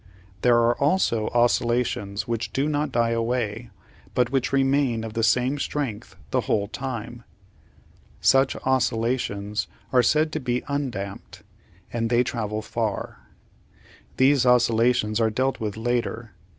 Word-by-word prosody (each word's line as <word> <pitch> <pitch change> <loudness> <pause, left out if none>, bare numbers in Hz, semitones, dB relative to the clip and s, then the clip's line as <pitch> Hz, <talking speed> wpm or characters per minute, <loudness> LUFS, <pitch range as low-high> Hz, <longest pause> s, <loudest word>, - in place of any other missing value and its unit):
There 120 -1 +5
are 120 0 +3
also 140 - +2
oscillations 120 -4 0
which 115 -1 -2
do 135 +2 0
not 150 -1 -1
die 115 -1 +1
away, 115 -1 -2 0.5
but 125 -1 +2
which 130 -2 0
remain 135 -4 +2
of 110 -1 -6
the 115 - -1
same 125 +5 +2
strength 115 -9 -4 0.2
the - - +2
whole 100 -1 0
time. 120 -1 -6 1.0
Such 135 0 +3
oscillations 115 -5 0 0.3
are 125 - +6
said 155 +6 +2
to 155 - -2
be 125 -2 -1
undamped, 125 -9 -5 0.5
and 115 -1 -1
they 120 +1 +3
travel 110 -3 -3
far. - - -3 1.0
These 135 0 +4
oscillations 120 -2 +3
are 110 - +3
dealt 130 +5 -1
with 105 -1 -4
later. 115 -1 -2
120 Hz, 130 wpm, -24 LUFS, 115-130 Hz, 1.0 s, are